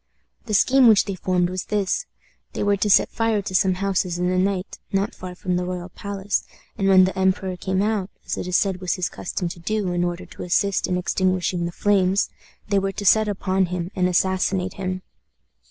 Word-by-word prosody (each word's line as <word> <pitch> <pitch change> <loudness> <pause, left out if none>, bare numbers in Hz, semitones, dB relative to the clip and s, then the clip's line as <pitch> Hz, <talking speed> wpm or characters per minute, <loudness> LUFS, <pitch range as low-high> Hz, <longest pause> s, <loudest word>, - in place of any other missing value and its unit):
The 215 - 0
scheme 260 +5 +5
which 215 -3 +6
they 200 - -3
formed 180 -1 0
was 185 0 -4
this: 210 - -1 0.5
they - - -2
were 205 0 +3
to 200 +2 0
set - - +5
fire 225 -3 0
to 185 - -6
some 185 0 +3
houses 185 -2 -1
in 180 0 0
the 185 - +1
night, 190 0 -1
not 195 +1 0
far 180 -1 -8
from 180 -1 -2
the 180 - -1
royal 180 0 -5
palace, 200 +1 -3 0.3
and 195 - 0
when 190 -1 +7
the 190 +1 0
emperor 190 0 0
came 190 +2 -1
out, 210 -3 -1 0.2
as - - -2
it - - -5
is 180 - +2
said 190 -2 0
was 180 - 0
his 180 -1 -2
custom 180 0 -4
to 170 - -9
do, 205 +1 -1
in 175 0 0
order 175 0 -3
to - - -12
assist 195 +2 +1
in 180 - 0
extinguishing 180 -1 0
the - - -5
flames, 195 0 +2 0.4
they 200 -1 +2
were 195 0 -2
to 205 - -5
set 215 +3 +5
upon 190 -2 0
him 175 0 -4
and 180 -1 +2
assassinate 185 +1 +1
him. 185 -2 -4
190 Hz, 215 wpm, -23 LUFS, 180-200 Hz, 0.5 s, when